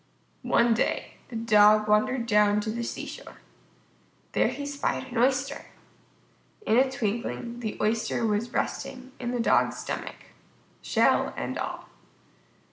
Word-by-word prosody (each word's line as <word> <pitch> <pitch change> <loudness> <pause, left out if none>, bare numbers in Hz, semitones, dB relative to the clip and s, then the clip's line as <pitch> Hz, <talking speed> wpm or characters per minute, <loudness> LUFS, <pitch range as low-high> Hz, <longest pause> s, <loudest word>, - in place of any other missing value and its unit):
One 235 0 +3
day 225 - -2
the 240 - -8
Dog 215 -1 +5
wandered 235 +4 +2
down 210 -2 +3
to 215 - -3
the 235 +2 -4
seashore. - - -7 0.9
There - - +2
he 285 - -4
spied 280 -2 -3
an 240 - -4
Oyster. 260 +2 +1 1.0
In 220 - +3
a 260 +1 +4
twinkling 235 +1 -3
the 220 -3 -4
Oyster 225 +2 0
was 215 +2 0
resting 260 0 -3
in 240 - -3
the 245 0 -2
Dog's 230 - +2
stomach, - - -6 0.6
shell - - +2
and - - -3
all. - - -5
235 Hz, 130 wpm, -27 LUFS, 215-255 Hz, 1.0 s, Dog